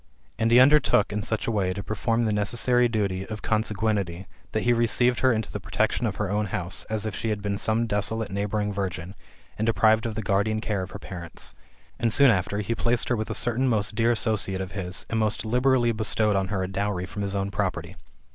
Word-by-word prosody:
And 115 0 +2
he 120 +1 +7
undertook, 130 -6 +4
in 105 - -1
such 110 +2 -2
a - - 0
way, 95 -4 0
to 100 - -6
perform 115 +3 0
the 110 - +1
necessary 120 +4 +2
duty 100 -5 -1
of 110 -1 -7
consanguinity, 105 -4 -1 0.3
that 110 - -1
he 120 - +3
received 120 +1 +2
her 130 - +4
into 110 -2 -2
the 105 - -4
protection 110 +3 0
of 100 - -3
his 105 - -1
own 105 +2 -1
house, 95 -2 -3
as 110 0 -3
if 110 -3 -3
she 115 - -3
had 105 -2 -2
been 100 -1 -2
some 110 +2 +1
desolate 105 0 -1
neighbouring 105 +1 -1
virgin, 95 -2 -4 0.5
and 110 - 0
deprived 110 0 +3
of 110 - -5
the 110 - -3
guardian 100 +2 +1
care 105 -3 -2
of 95 - -5
her 100 - -7
parents; 85 -4 -8 0.5
and 115 - +1
soon 140 +2 +6
after 100 +1 -1
he 110 +3 -2
placed 120 +1 0
her 125 - +2
with 110 -1 -3
a - - -2
certain 120 +3 +1
most 105 -5 0
dear 115 +2 +2
associate 110 -4 0
of 95 -1 -5
his, 90 -1 -4
and 115 - -1
most 110 +1 0
liberally 125 +1 +2
bestowed 110 -1 +1
on 95 -1 +1
her 95 -1 -2
a - - -2
dowry 95 -1 -2
from 100 +2 -6
his 100 0 -2
own 100 0 -1
property. - - -3
105 Hz, 225 wpm, -25 LUFS, 100-115 Hz, 0.5 s, he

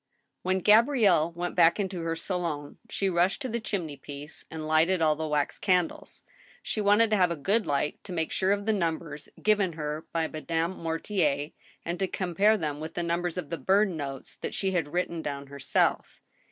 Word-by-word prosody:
When 185 +1 0
Gabrielle 210 - +5
went 175 +1 -3
back 165 +4 +5
into 190 -3 -2
her 165 0 -1
saUm^ 165 -5 -3
she 195 - -1
rushed 180 +3 +2
to - - -1
the 235 0 -2
chiifiney 165 -10 -4
piece 145 +2 -5
and 160 -1 -6
lighted 160 +4 +3
all 155 -2 +3
the 160 +1 -3
wax 150 -1 0
candles. 180 -3 0 0.4
She 215 - -1
wanted 210 +2 +4
to 215 - +4
have 180 -2 +4
a 170 - -1
good 200 +9 0
light 145 +1 -1
to 195 - -7
make 165 -3 -2
sure 190 +1 +1
of 200 0 0
the 220 - +2
numbers 165 -5 -2
given 205 -4 +3
her 150 0 -4
by 165 -1 0
Madame 165 +3 -2
Mortier, 165 -3 -1 0.3
and 170 +1 -3
to 190 - +1
compare 195 +4 +2
them 150 -5 -3
with 160 +1 -7
the 175 - -1
num 170 +1 0
bers 175 0 -2
of 165 -5 -5
the 165 - -3
burned 195 +5 +3
notes 140 -3 -6
that - - -5
she 195 -1 0
had 165 -5 -1
written 175 -2 -1
down 140 -2 -4
herself. 140 0 0
170 Hz, 200 wpm, -28 LUFS, 155-190 Hz, 0.4 s, Gabrielle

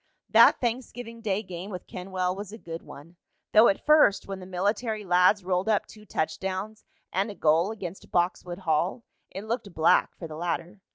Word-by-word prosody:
That - - +7
Thanksgiving 235 -1 -4
Day 210 -1 -1
game 185 0 -7
with 180 -3 -7
Kenwell 185 0 -3
was 200 0 -7
a 220 - -8
good 165 -5 -7
one, 165 +5 -13 0.3
though 220 +2 +7
at 195 - 0
first, 300 -10 +5
when 195 -1 -5
the 185 - -10
military 210 +4 -1
lads 180 +2 +4
rolled 185 +2 0
up 210 -2 +2
two 215 -1 -15
touchdowns 190 +6 -3 0.3
and 195 +4 0
a 205 - -7
goal 165 +4 +3
against 195 -4 -8
Boxwood 175 0 -1
Hall, 170 +8 0 0.3
it 195 - -7
looked 220 -2 -3
black 160 +2 +3
for 165 - -7
the 155 - -9
latter. 175 +3 -3
190 Hz, 180 wpm, -27 LUFS, 175-215 Hz, 0.3 s, That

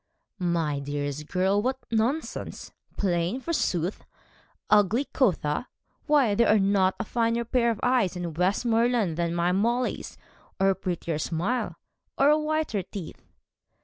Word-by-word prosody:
'My 165 -5 0
dearest 145 +1 -4
girl, 190 +2 +1
what 260 +3 -1
nonsense! 235 +8 -2 0.3
Plain, 175 +4 0
forsooth? 190 - -1 0.7
Ugly, 210 +6 +4
quotha? 185 - +1 0.4
Why, 285 -8 +4
there 235 +2 +3
are 215 - +6
not 195 -1 +2
a - - 0
finer 230 +1 0
pair 235 0 +2
of 225 - -1
eyes 245 -8 +2
in 175 -2 -4
Westmoreland 225 +2 +1
than 170 0 -1
my 170 +1 +1
Molly's, 235 +6 -1 0.4
or 195 0 +4
a - - -1
prettier 170 -4 -3
smile, 185 +11 -1 0.4
or 300 +2 +4
whiter 310 -9 0
teeth.' 180 -2 -8
200 Hz, 130 wpm, -26 LUFS, 175-240 Hz, 0.7 s, are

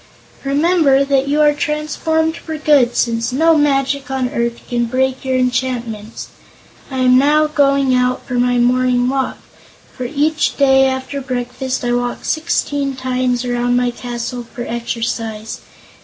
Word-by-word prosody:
Remember 280 -1 +3
that 275 -1 +1
you 295 +2 +2
are 295 -1 +5
transformed 305 +2 -1
for 320 -2 -6
good, 285 -5 +3
since 230 0 0
no 325 +5 +3
magic 280 -1 +1
on 260 -2 -1
earth 235 -3 -2
can 240 -1 0
break 260 +2 -1
your 260 -1 0
enchantments. 240 -4 -2 0.6
I 265 - -5
am 255 0 +5
now 300 +3 +3
going 275 -3 +2
out 250 0 0
for 245 0 -2
my 245 0 +2
morning 250 0 +2
walk, 265 0 -1 0.6
for 255 - -5
each 300 +4 0
day 270 -1 +4
after 260 +2 -3
breakfast 255 0 -3
I 240 - 0
walk 245 0 -2
sixteen 285 -3 -1
times 255 -1 -1
around 245 0 0
my 245 0 +1
castle 240 0 -5
for 245 -2 -6
exercise. 225 -2 -4
260 Hz, 145 wpm, -17 LUFS, 245-280 Hz, 0.6 s, are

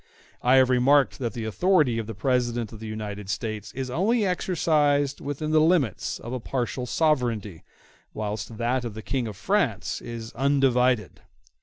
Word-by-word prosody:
I 125 +2 +4
have 130 -1 +5
remarked 135 +2 +3
that 120 -3 -2
the 115 -3 -4
authority 140 - +2
of 110 - -4
the 110 - -6
President 120 -1 0
in 110 - -10
the 110 - -7
United 105 -2 -6
States 105 0 -4
is 130 -1 -4
only 210 - +2
exercised 150 -6 +1
within 145 +2 -3
the 155 0 +5
limits 155 - +1
of 120 - -7
a 130 - -2
partial 125 +1 -3
sovereignty, 120 - 0 0.5
whilst 110 +1 -5
that 120 +2 0
of 115 -3 -5
the 110 - -7
King 130 -4 -2
in 110 - -5
France 110 - -1
is 115 -1 -7
undivided. 130 -5 +2
125 Hz, 165 wpm, -25 LUFS, 110-145 Hz, 0.5 s, have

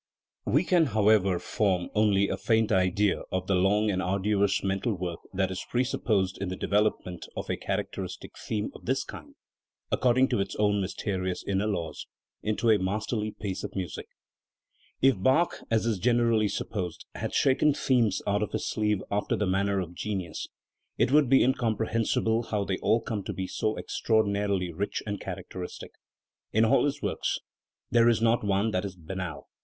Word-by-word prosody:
We 140 - +3
can, 175 -3 +3
however, 100 -3 +4
form 95 -2 0
only 100 -2 +3
a - - -1
faint 110 -1 +1
idea 95 +1 +2
of 95 0 -1
the 95 - 0
long 100 +3 +3
and 95 -1 -1
arduous 100 +1 +1
mental 100 +3 0
work 90 -2 -4
that 95 -1 0
is 95 - -4
presupposed 105 -6 0
in 100 - -2
the 90 - -3
develop 105 +3 +1
ment 90 -1 -7
of - - -3
a - - 0
characteristic - - -4
theme 105 -1 -3
of - - -13
this - - 0
kind, - - -11 0.6
according 130 +1 +3
to - - +1
its 100 0 -2
own 105 -1 +2
mysterious 95 -1 -3
inner 100 +1 0
laws, 85 -7 -3 0.3
into 110 +2 +1
a 105 - +4
masterly 105 +3 -1
piece 100 -3 -5
of - - -6
music* 90 -4 -4 1.0
If 130 -8 +4
Bach, 135 - +3
as 115 0 +2
is 110 -5 0
generally 115 -1 +3
supposed, 95 -4 -4
had - - -4
shaken 135 +2 +4
themes 115 -7 +2
out 100 +1 +1
of 105 - -2
his - - -2
sleeve 105 -2 0
after 105 +1 0
the 105 - 0
manner 100 +1 +1
of 90 -2 -4
genius, 95 -1 -4 0.5
it - - +2
would 145 -3 +5
be 135 - +6
incomprehensible 115 -1 +1
how 105 -2 0
they 95 -1 -2
all 115 - +2
come 110 -3 -3
to - - -3
be 95 - -3
so 110 +3 -1
extraordinarily 100 -5 0
rich 100 +5 -3
and 105 -1 -4
char 95 - -4
ct 95 -1 -13
eristic. 90 -1 -7 0.6
In 110 +1 +4
all 135 +5 +4
his 145 - -2
works - - -1 0.5
there 120 0 +5
is 115 - +3
not 115 0 +2
one 100 +2 +1
that 90 -3 0
is 100 -2 -5
banal. 90 -1 -6
105 Hz, 180 wpm, -28 LUFS, 95-110 Hz, 1.0 s, be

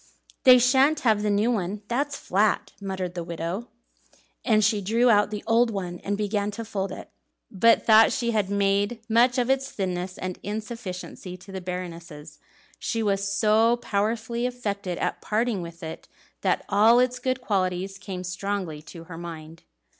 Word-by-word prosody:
"They 255 -1 +10
shan't 265 +5 +4
have 220 -4 +3
the 210 - 0
new 205 +4 +2
one, 205 -1 -2
that's 280 +5 -1
flat," 205 +1 0
muttered 190 -2 -4
the 175 -1 -4
widow; 170 +7 -4 0.8
and 215 -4 +3
she 210 -2 +2
drew 230 +5 +3
out 205 -1 +4
the 210 -1 -5
old 230 +1 +3
one 180 -4 -4
and 205 0 -3
began 205 0 -1
to 230 - -5
fold 195 -2 -3
it - - -6
up. - - -11 0.4
But 230 +4 +4
though 220 0 +7
she 235 -1 -1
had 210 -4 0
made 200 +3 0
much 240 +3 +4
of 245 -1 +1
its 270 +1 +1
thinness 185 -1 -3
and 185 -1 -5
insufficiency 205 -4 -6
to 180 +2 -14
the 190 -1 -5
Baroness, 170 -4 -7 0.4
she 225 -1 -2
was 200 -1 0
so 220 +4 +3
powerfully 225 +2 -1
affected 200 -7 -4
at - - -2
parting 220 -2 0
with 170 0 -9
it, 160 0 -7 0.3
that - - 0
all 215 +4 +5
its 250 0 +1
good 255 0 -1
qualities 195 -3 -1
came 190 -3 -6
strongly 185 -4 -3
to 165 +2 -11
her 165 0 -9
mind. 165 -1 -9
205 Hz, 170 wpm, -25 LUFS, 185-230 Hz, 0.8 s, They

